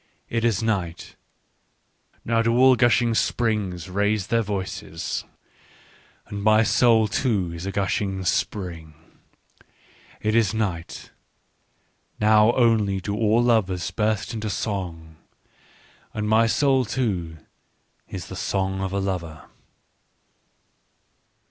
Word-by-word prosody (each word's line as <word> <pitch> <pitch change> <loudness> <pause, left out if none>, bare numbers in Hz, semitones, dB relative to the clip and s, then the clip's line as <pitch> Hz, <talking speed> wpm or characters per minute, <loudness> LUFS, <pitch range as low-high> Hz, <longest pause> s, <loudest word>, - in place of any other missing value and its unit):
" - - -43
It 115 - 0
is 115 -3 +1
night: 95 -7 -3 1.1
now 115 0 +2
do 115 +1 +1
all 130 0 +6
gushing 120 -1 +3
springs 105 -7 -1
raise 100 +1 0
their 115 +2 +1
voices. 95 -5 -4 1.0
And 100 0 -6
my 110 +1 +4
soul 115 -1 +4
too 105 -6 -1
is 85 +3 -6
a - - -2
gushing 95 -1 -1
spring. 85 -5 -2 0.6
" - - -28 0.6
It 110 0 -1
is 110 -2 +2
night: 95 -7 -4 1.1
now 105 +1 +5
only 110 -5 +2
do 100 +2 -4
all 110 +2 +2
lovers 95 -8 +1
burst 110 +1 -1
into 110 -1 -3
song. 85 -7 -4 1.0
And 105 -1 -2
my 110 +1 +4
soul 135 +1 +2
too 100 -9 -2 0.7
is - - -6
the - - -9
song 95 -1 -2
of 95 -1 -2
a 100 - 0
lover." 85 -6 -4
105 Hz, 115 wpm, -24 LUFS, 95-115 Hz, 1.1 s, all